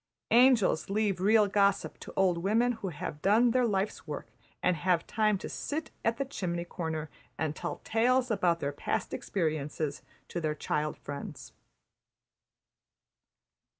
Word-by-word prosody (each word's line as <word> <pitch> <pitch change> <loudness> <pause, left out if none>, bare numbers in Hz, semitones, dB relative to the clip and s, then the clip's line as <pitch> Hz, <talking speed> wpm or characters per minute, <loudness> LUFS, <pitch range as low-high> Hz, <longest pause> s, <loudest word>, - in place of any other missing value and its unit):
Angels 235 -9 +5
leave 200 -3 0
real 210 +2 +5
gossip 200 0 +1
to - - -9
old 185 -3 +3
women 225 +7 +2
who 220 -4 -5
have 150 -2 -6
done 225 +6 +4
their 250 0 +3
life's 200 -1 -1
work - - -5 0.4
and 180 - +3
have 175 0 +1
time 215 -2 +2
to - - -6
sit 315 +2 -4
in 230 +1 +2
the 275 - -1
chimney 175 -9 -3
corner 160 -3 -4 0.3
and 155 -1 -1
tell - - -5
tales 245 +3 +2
about 175 -5 +2
their 140 - -1
past - - -2
experiences 155 -5 -2 0.3
to 175 - -3
their 155 -1 -1
child 150 0 -2
friends. 140 0 -8
195 Hz, 145 wpm, -30 LUFS, 160-225 Hz, 0.4 s, Angels